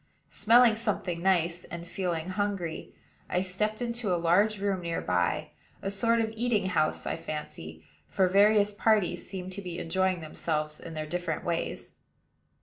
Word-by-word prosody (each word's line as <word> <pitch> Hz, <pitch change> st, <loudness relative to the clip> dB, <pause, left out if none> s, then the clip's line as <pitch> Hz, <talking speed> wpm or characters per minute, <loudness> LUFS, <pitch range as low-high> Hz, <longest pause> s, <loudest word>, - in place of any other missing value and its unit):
Smelling 230 Hz, +1 st, +5 dB
something 195 Hz, -6 st, -2 dB
nice, 175 Hz, -2 st, +1 dB
and 170 Hz, 0 st, -8 dB
feeling 175 Hz, -2 st, -2 dB
hungry, 185 Hz, -3 st, -3 dB, 0.4 s
I 180 Hz, -, +1 dB
stepped 210 Hz, +5 st, -2 dB
into 235 Hz, -4 st, -2 dB
a 175 Hz, -, +3 dB
large 190 Hz, +6 st, +3 dB
room 195 Hz, -2 st, 0 dB
near 170 Hz, -1 st, -2 dB
by, 90 Hz, -1 st, 0 dB, 0.3 s
a 195 Hz, -, -1 dB
sort 230 Hz, +4 st, +2 dB
of 220 Hz, -1 st, -1 dB
eating 225 Hz, -4 st, +1 dB
house, 155 Hz, -3 st, 0 dB
I -, -, -1 dB
fancy; 80 Hz, -, -7 dB, 0.2 s
for 190 Hz, -1 st, +2 dB
various 205 Hz, +2 st, +4 dB
parties 210 Hz, -3 st, +1 dB
seemed 185 Hz, -1 st, -5 dB
to 200 Hz, +2 st, -6 dB
be 180 Hz, -2 st, -6 dB
enjoying 185 Hz, +1 st, 0 dB
themselves 155 Hz, -1 st, -3 dB
in 165 Hz, -1 st, -8 dB
their 155 Hz, 0 st, -3 dB
different 175 Hz, 0 st, -3 dB
ways. 170 Hz, -1 st, -3 dB
185 Hz, 155 wpm, -29 LUFS, 170-205 Hz, 0.4 s, Smelling